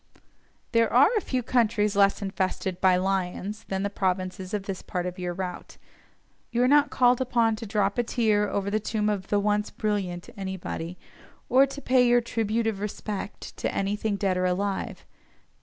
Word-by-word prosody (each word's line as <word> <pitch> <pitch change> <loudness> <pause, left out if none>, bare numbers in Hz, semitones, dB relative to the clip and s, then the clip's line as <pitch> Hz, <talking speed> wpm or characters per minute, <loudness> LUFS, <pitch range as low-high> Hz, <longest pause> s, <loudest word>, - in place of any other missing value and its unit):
There 230 -1 +3
are 360 - +5
few 255 -7 -2
countries 220 -4 +2
less 200 0 +3
infested 190 -1 -2
by 185 -1 +5
"lions" 195 +2 -2
than 190 0 -2
the 200 - 0
provinces 185 -1 -2
on 210 -2 -2
this 195 -1 -5
part 180 -1 -3
of 180 0 -5
your 180 -1 -2
route. 180 0 -6 0.7
You 240 +1 +1
are - - +4
not 290 +2 +5
called 250 0 +3
upon 235 -3 +2
to 225 - -7
"drop 200 +1 0
a - - +3
tear" 215 -3 +1
over 200 0 -2
the 215 - +1
tomb 215 0 -1
of 200 -3 -2
"the 205 - +2
once 210 0 +1
brilliant" 195 -5 -2
anybody, 190 -3 -5 0.5
or 270 +2 +6
to 280 +1 -8
pay 255 -1 +4
your 240 0 +5
"tribute 225 -1 -1
of 220 -3 -1
respect" 205 0 -5
to - - -1
anything 205 +2 -1
dead 195 -2 0
or 180 - +1
alive. 195 +2 -2
205 Hz, 175 wpm, -26 LUFS, 190-230 Hz, 0.7 s, or